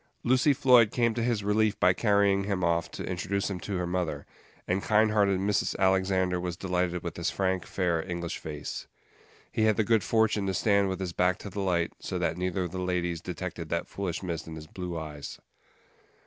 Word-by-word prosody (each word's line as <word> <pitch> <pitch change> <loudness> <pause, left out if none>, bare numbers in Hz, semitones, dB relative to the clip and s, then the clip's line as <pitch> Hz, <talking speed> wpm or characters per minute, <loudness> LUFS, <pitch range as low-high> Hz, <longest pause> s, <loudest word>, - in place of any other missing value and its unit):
Lucy 130 +4 +4
Floyd 125 -4 +5
came 115 0 +1
to 120 - -2
his 115 -3 0
relief 105 +1 +2
by 90 +1 +5
carrying 100 -2 +2
him 100 -3 -1
off 85 -1 +1
to - - -6
introduce 100 +2 -2
him 90 - -4
to 95 +2 -3
her 90 - -1
mother, 90 -1 -2 0.4
and 95 +2 +1
kind 110 +1 +3
hearted 100 -3 +3
Mrs. 100 +1 0
Alexander 95 -1 +2
was 90 -1 -4
delighted 90 -1 -1
with 85 -1 -5
his 85 +1 0
frank, 95 -2 -1
fair 85 -4 0
English 85 -1 -3
face. 75 -2 -6 0.6
He 110 - +1
had 110 -2 +3
the 110 - +3
good 110 0 +2
fortune 110 -3 +2
to 95 - -1
stand 100 0 +3
with 95 -1 -3
his 90 -2 -3
back 90 +1 +2
to 100 - -8
the 100 - -3
light, 85 -3 0
so - - -4
that - - 0
neither 90 +1 -1
of 90 - -4
the 95 0 -4
ladies 90 -2 -1
detected 90 -2 -5
that 85 - -1
foolish 95 -2 -4
mist 85 -3 -4
in 80 - -7
his 80 -1 -8
blue 90 +1 -6
eyes. 75 -3 -7
95 Hz, 205 wpm, -28 LUFS, 90-100 Hz, 0.6 s, Floyd